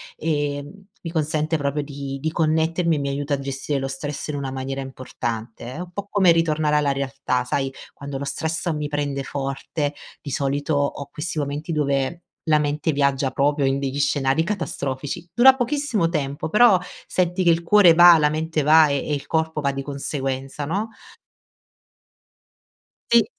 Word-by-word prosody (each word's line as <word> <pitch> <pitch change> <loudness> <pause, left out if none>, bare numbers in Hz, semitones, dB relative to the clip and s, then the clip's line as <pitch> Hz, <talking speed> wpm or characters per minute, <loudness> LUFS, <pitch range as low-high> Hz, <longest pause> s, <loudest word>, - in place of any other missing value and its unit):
e, 145 -2 -1
mhmm, 195 +8 -14 0.2
mi 165 - -4
consente 155 0 0
proprio 145 0 -1
di 140 -1 -6
di 160 +2 -1
connettermi 160 +1 +1
e - - -1
mi 140 0 -2
aiuta 145 +1 -2
a 140 - 0
gestire 135 +1 -3
lo 135 - -2
stress 140 +2 -5
in 150 - -3
una 140 -2 -3
maniera 135 +1 -4
importante, 120 -3 -6
è - - -8
un 180 0 -6
po' 200 +2 -6
come 190 -4 +5
ritornare 155 -2 +2
alla 145 -1 +2
realtà, 135 -2 -1
sai, 135 +1 -2 0.2
quando 140 -1 -6
lo - - -4
stress 160 +4 -2
mi 150 -1 -2
prende 145 -2 -2
forte 140 +2 -3 0.3
di 145 - -7
solito 140 +3 -1
ho 140 0 -1
questi 160 +2 -4
momenti 145 +3 -3
dove 140 +1 0 0.2
la 155 -2 +4
mente 150 +1 0
viaggia 140 -2 +1
proprio 140 +1 +1
in 135 +1 +1
degli 140 0 -3
scenari 140 +1 +2
catastrofici. 165 -4 -4
Dura 260 +3 +7
pochissimo 250 - 0
tempo 145 -2 -3
però 210 -1 +6 0.3
senti 180 0 0
che 175 - +4
il 165 +1 +1
cuore 185 -1 +6
va, 175 0 +9
la 150 -1 +3
mente 155 +1 -1
va 155 +2 +6
e 140 - +1
e 150 - -1
il 140 - -6
corpo 160 -1 -1
va 140 -1 +1
di 135 0 -4
conseguenza, 135 0 -4
no 200 +9 -2 2.2
Sì. 235 -3 +6
145 Hz, 175 wpm, -23 LUFS, 140-165 Hz, 2.2 s, va